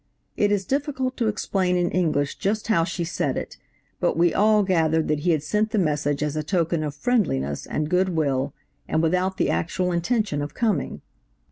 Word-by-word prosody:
It 205 0 +2
is 200 -2 +1
difficult 265 - -1
to 235 - +1
explain 190 -3 0
in 175 0 +1
English 150 -6 0
just 210 +2 -1
how 170 -7 +4
she 170 +1 -3
said 145 -5 -1
it, - - -6 0.4
but 175 - +1
we 170 0 +3
all 210 0 +4
gathered 160 -4 +2
that 150 -1 +1
he 175 - -1
had 155 -4 +2
sent 210 +6 0
the 220 - -1
message 145 -5 0
as 150 0 -2
a 155 - 0
token 170 -1 0
of 145 -1 -4
friendliness 145 - 0
and 150 0 -2
good 180 +3 +2
will, 140 -5 0 0.4
and 160 - +1
without 185 +3 +1
the - - +1
actual 180 - -1
intention 175 -2 0
of 145 0 -5
coming. 210 - -1
175 Hz, 195 wpm, -24 LUFS, 150-205 Hz, 0.4 s, how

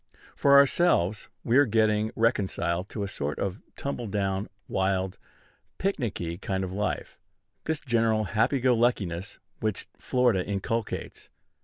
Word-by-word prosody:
For 140 0 +6
ourselves, 140 - +3
we 120 +3 +3
are 145 - +5
getting 110 -1 +2
reconciled 95 -5 0
to 105 - -4
a - - -2
sort 75 -6 -3
of 100 +2 -3
tumble 130 -4 -4
down, 100 -1 -1 0.2
wild, 95 -1 0 0.6
picnicky 105 - -2
kind 95 -1 -1
of 95 - -4
life, 105 +2 -3 0.5
this 160 -1 -1
general 115 -4 +1
happy 110 +6 +1
go 125 0 +4
luckiness 100 -6 0 0.2
which 110 -3 -1
Florida 120 -7 +2
inculcates. 105 +3 -3
105 Hz, 130 wpm, -27 LUFS, 95-120 Hz, 0.6 s, For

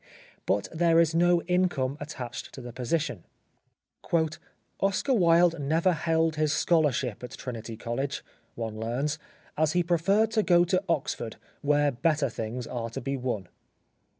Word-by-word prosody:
But 100 +1 +1
there 165 0 +4
is 165 -1 +3
no 175 +1 +3
income 175 -7 +1
attached 130 -5 -7
to 130 - -8
the 120 -1 -8
position. 125 - -2 0.8
" 160 -1 -3
Oscar 200 +8 +1
Wilde 170 -4 +4
never 160 +6 +2
held 160 -1 +1
his 155 -1 +2
scholarship 150 - +1
at 125 - -7
Trinity 115 -3 -6
College," 135 +5 -3 0.3
one 110 -2 -4
learns, 135 +7 -1 0.4
"as 155 0 +2
he 175 0 +3
preferred 195 +6 +2
to 220 - +3
go 175 -3 +5
to 185 +2 +1
Oxford, 140 -7 -1 0.3
where 145 0 +3
better 150 +1 +1
things 115 +3 -4
are 115 -1 -4
to 115 - -5
be 135 +2 -2
won." 125 -8 -3
150 Hz, 150 wpm, -28 LUFS, 125-170 Hz, 0.8 s, go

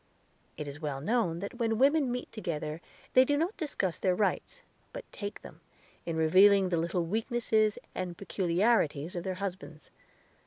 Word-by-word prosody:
It 150 - -5
is 145 +2 -8
well 145 -3 -3
known 175 - 0
that 200 +5 -6
when 225 -2 +1
women 280 +1 +3
meet 250 0 -4
together 155 -6 -4 0.3
they 255 - +7
do 285 +2 +1
not 335 +8 -1
discuss 280 - -2
their 185 -1 +2
rights, 215 - -1 0.3
but - - -7
take 205 0 -7
them, - - -12 0.5
in 165 - -2
revealing 190 +4 +5
the 175 - +1
little 170 +1 -1
weaknesses 220 +1 +1 0.2
and 180 -2 -4
peculiarities 180 -4 +1
of 175 - -3
their 185 0 -3
husbands. 185 -5 -7
195 Hz, 160 wpm, -30 LUFS, 170-235 Hz, 0.5 s, they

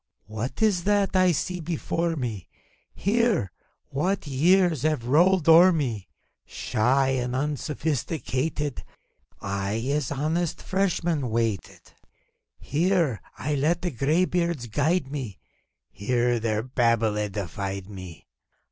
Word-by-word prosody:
What 110 - -4
is 195 -6 +2
that 205 -2 +2
I 185 -1 +5
see 180 +3 -2
before 170 0 -2
mef 115 - -4 0.5
Here, 210 - +1 0.4
(what 180 +8 -1
years 165 +2 +3
have 155 -5 0
rolled 170 +6 +3
o'er 170 +3 +8
me!) 120 - -2 0.4
Shy 130 +5 +1
and 125 -1 -1
unsophisticated, 145 0 -2 0.6
I 100 +1 -2 0.2
as 145 -3 -1
honest 160 +4 -1
freshman 175 -8 0
waited; 110 -3 -3 0.7
Here 165 - 0 0.2
I 150 +2 -2
let 155 +5 +1
the 175 - -1
gray 150 +8 +2
beards 170 -8 -1
guide 145 +5 0
me, 130 -10 -5 0.5
Here 120 +3 0
their 110 -1 -1
babble 115 -3 +1
edified 100 -2 -4
me 95 -6 -10
145 Hz, 110 wpm, -25 LUFS, 115-170 Hz, 0.7 s, o'er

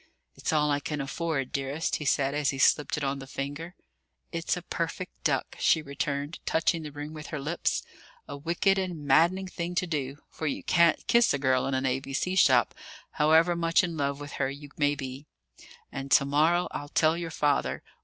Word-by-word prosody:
"It's - - -3
all 150 -1 +2
I 145 - +1
can 150 +1 -4
afford, 140 -1 -2
dearest," 140 +4 -2
he 150 - -6
said, 135 0 +2
as 150 -1 +1
he 135 - -2
slipped 145 +3 +3
it 150 - -3
on 135 0 -1
the 135 - -9
finger. 145 +6 -5 0.6
"It's 165 +1 -1
a 175 - -7
perfect 170 +2 -5
duck," 135 -4 0
she 160 - +3
returned, 140 +1 -3
touching 165 +1 +1
the 150 -1 -7
ring 145 +1 -7
with 155 -1 -8
her 150 - -4
lips 150 +5 -1 0.4
a - - -6
wicked 170 +6 +1
and 175 -6 -4
maddening 175 +7 +3
thing 175 -1 -5
to 180 - +1
do; 145 -5 -3
for 155 - -5
you 140 - -3
can't 170 -2 +3
kiss 235 -9 +4
a - - -1
girl 130 -2 +1
in 135 - -1
an 130 0 -1
A.B.C. 135 +7 -1
shop, 130 -8 +5 0.4
however 160 +3 +4
much 165 0 +2
in 170 -2 -2
love 140 -2 -1
with 145 0 -8
her 135 - +1
you 145 +1 -9
may 145 -1 +2
be. 135 +1 -7 0.6
"And 135 0 -6
to 140 - +6
morrow 160 +5 +2
I'll 145 - -6
tell 155 +2 +3
your 170 -1 -4
father. 145 -3 0
150 Hz, 200 wpm, -28 LUFS, 140-165 Hz, 0.6 s, to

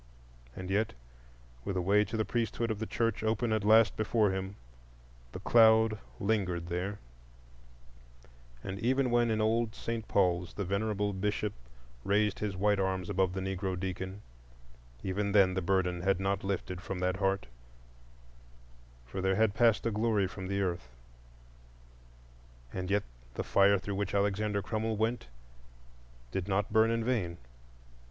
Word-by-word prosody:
And 95 0 -6
yet, 105 - +1 0.7
with 95 - -3
a - - +1
way 100 +4 +4
to 110 +2 -4
the 110 - 0
priesthood 115 +1 -1
of 105 - -3
the 110 - -3
Church 115 -1 -1
open 110 +1 0
at 110 -2 0
last 110 +1 +5
before 110 -1 +2
him, 95 +1 -4 0.8
the - - -7
cloud 110 -2 +5 0.2
lingered 95 -5 -1
there; 90 +4 -2 1.7
and 95 +1 -5
even 130 +2 +1
when 120 -1 +3
in 110 -1 +1
old 110 +1 +1
St. 115 -1 -4
Paul's 90 -3 +1
the 100 - -3
venerable 100 +1 -1
Bishop 105 +2 -1 0.5
raised 105 +1 +1
his 100 -3 -3
white 105 +1 +2
arms 95 +1 -1
above 95 -1 +1
the 95 - -3
Negro 95 -1 -2
deacon—even - - -6
then 95 -3 +5
the 95 - -1
burden 90 -1 0
had 95 0 +1
not 95 0 -1
lifted 95 -2 -3
from 95 -1 -5
that 90 +1 0
heart, 95 0 0 1.6
for - - -5
there 95 0 +2
had 110 0 +3
passed 115 0 +3
a 115 - +1
glory 105 -2 +1
from 95 0 -6
the 100 +1 -1
earth. 85 -8 -3 1.8
And 90 0 -4
yet 100 +1 +2 0.3
the - - -2
fire 100 0 +4
through 100 +2 -5
which 100 0 -2
Alexander 100 0 0
Crummell 110 +1 -2
went 110 - -1 1.0
did 95 +4 -3
not 100 +1 0
burn 110 0 +5
in 115 0 0
vain. 105 -9 -1
100 Hz, 150 wpm, -31 LUFS, 95-110 Hz, 1.8 s, last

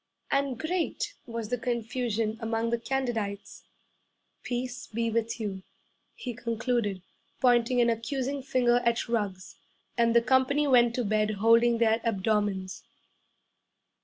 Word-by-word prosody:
'And 275 -3 +1
great 345 - -2
was 230 -2 -5
the 245 - -1
confusion 230 -2 -1
among 225 0 -1
the 235 - 0
candidites. 235 -6 -3 0.8
'Peace 245 0 -4
be 230 +1 -2
with 230 +1 -1
you,' 200 -3 -4 0.5
he 245 - -5
concluded, 230 -4 -2 0.4
pointing 245 0 +3
an 235 - +4
accusing 265 +4 -2
finger 250 -2 +2
at 235 -1 0
Ruggs; 205 -5 -3 0.4
and 235 0 +2
the 235 - +7
company 260 +4 +3
went 240 -3 +4
to 245 - -1
bed 215 0 +1
holding 230 +3 +4
their 225 0 +2
abdomens. 205 -3 -1
235 Hz, 125 wpm, -28 LUFS, 220-250 Hz, 0.8 s, the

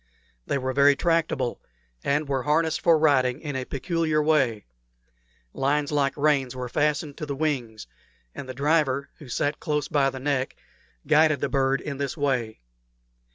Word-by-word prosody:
They - - 0
were 130 -1 -2
very 140 +1 +5
tractable, 165 -6 0 0.4
and 145 +2 0
were 135 -2 -1
harnessed 160 +3 +1
for 165 -2 +5
riding 135 -4 +2
in 145 -3 -5
a 130 -1 -3
peculiar 160 +2 -1
way; 150 -9 +1 0.9
lines 145 +2 0
like 140 -2 0
reins 140 -4 +1
were 125 -1 -4
fastened 145 +2 -1
to 150 - -5
the 140 - -3
wings, 130 -7 -2 0.5
and 130 - -8
the 130 - -6
driver, 140 -1 +1
who 140 - -12
sat 145 +4 -1
close 150 -1 -1
by 140 -2 +2
the 130 - -7
neck, 135 -1 -1 0.5
guided 155 -1 +4
the - - -1
bird 135 -1 +1
in 140 -2 -5
this 140 +3 -3
way. 125 - -1
140 Hz, 160 wpm, -25 LUFS, 130-150 Hz, 0.9 s, very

